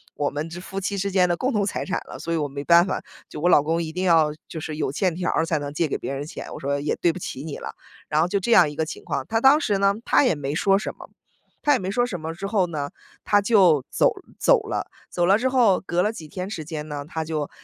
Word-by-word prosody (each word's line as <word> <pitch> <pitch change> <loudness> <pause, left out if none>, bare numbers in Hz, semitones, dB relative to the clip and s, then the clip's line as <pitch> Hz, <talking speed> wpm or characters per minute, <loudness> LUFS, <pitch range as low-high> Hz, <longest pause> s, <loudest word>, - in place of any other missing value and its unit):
我 145 - 0
们 150 +3 -4
之 175 +2 -7
夫 195 +1 -5
妻 200 +1 -3
之 200 0 -1
间 180 -1 +4
的 170 - +1
共 255 0 -1
同 210 - +1
财 - - -3
产 190 - -2
了， - - -7
所 170 - -3
以 - - +1
我 150 - -1
没 140 0 -6
办 170 +2 +6
法。 - - -2 0.3
就 150 - -7
我 175 - +3
老 150 - +6
公 165 +2 0
一 155 - -5
定 180 +1 -2
要 160 -3 +4 0.2
就 160 - -6
是 155 0 -5
有 145 - -1
欠 180 +5 0
条 180 -1 -2
儿 165 - +1
才 160 -2 0
能 145 0 -5
借 165 +1 0
给 - - -2
别 - - -4
人 140 - -4
钱”。 155 - -8
我 - - -7
说： 140 +1 -1
“也 150 - -1
对 170 - +2
不 185 - -7
起 135 -4 -6
你 155 -3 -6
了”， - - -7 0.4
然 150 - +1
后 170 - +2
就 200 +2 0
这 235 +5 -2
样 155 - +7
一 - - -10
个 160 +1 -1
情 155 - -8
况。 135 -2 -2
他 225 0 +1
当 275 +4 +6
时 205 -3 +1
呢， 200 0 +3
他 - - +4
也 250 - +2
没 145 0 -4
说 195 +3 +3
什 - - -5
么， - - -13 0.5
他 290 - +4
也 - - +2
没 190 0 -3
说 245 +4 +2
什 190 -8 -5
么 160 +1 -5
之 195 +3 -5
后 195 -4 +1
呢， 145 -3 -4 0.4
他 205 -1 +4
就 185 - +4
走 - - +3 0.3
走 - - +4
了。 - - -3 0.2
走 175 - 0
了 195 +3 +5
之 260 +3 0
后， 240 -8 +3
隔 175 0 +1
了 210 +3 +1
几 160 -8 -9
天 185 +5 -5
时 165 -7 -5
间 155 -1 -5
呢， 145 -1 -5
他 160 -1 -3
就 155 -2 -3
170 Hz, 315 characters per minute, -24 LUFS, 150-195 Hz, 0.5 s, 样